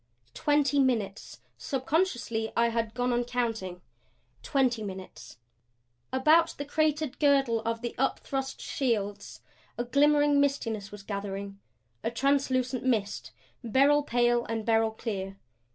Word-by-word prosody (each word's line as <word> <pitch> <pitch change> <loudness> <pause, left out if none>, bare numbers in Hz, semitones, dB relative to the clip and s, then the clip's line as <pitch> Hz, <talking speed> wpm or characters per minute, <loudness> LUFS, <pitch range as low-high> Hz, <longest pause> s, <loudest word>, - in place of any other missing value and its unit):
Twenty 290 -1 +2
minutes 230 -7 -1 0.2
subconsciously 260 -6 -1
I 235 0 +4
had 230 -1 -2
gone 245 0 0
on 240 0 +1
counting 225 -7 -3 0.6
twenty 255 -5 +1
minutes 190 -8 -8 0.7
About 315 +5 +4
the 285 - -4
cratered 305 -1 0
girdle 275 -6 +3
of 230 0 -2
the 240 -1 -4
upthrust 270 0 -2
shields 210 -7 -2 0.4
a 240 - -1
glimmering 290 +3 +4
mistiness 230 -8 -1
was 205 -1 -10
gathering; 200 -1 -5 0.4
a - - 0
translucent 255 0 0
mist, 205 - -1 0.3
beryl 275 +5 +4
pale 240 -3 +2
and 225 -1 -3
beryl 225 -1 +3
clear. 195 -3 -5
240 Hz, 120 wpm, -28 LUFS, 220-275 Hz, 0.7 s, I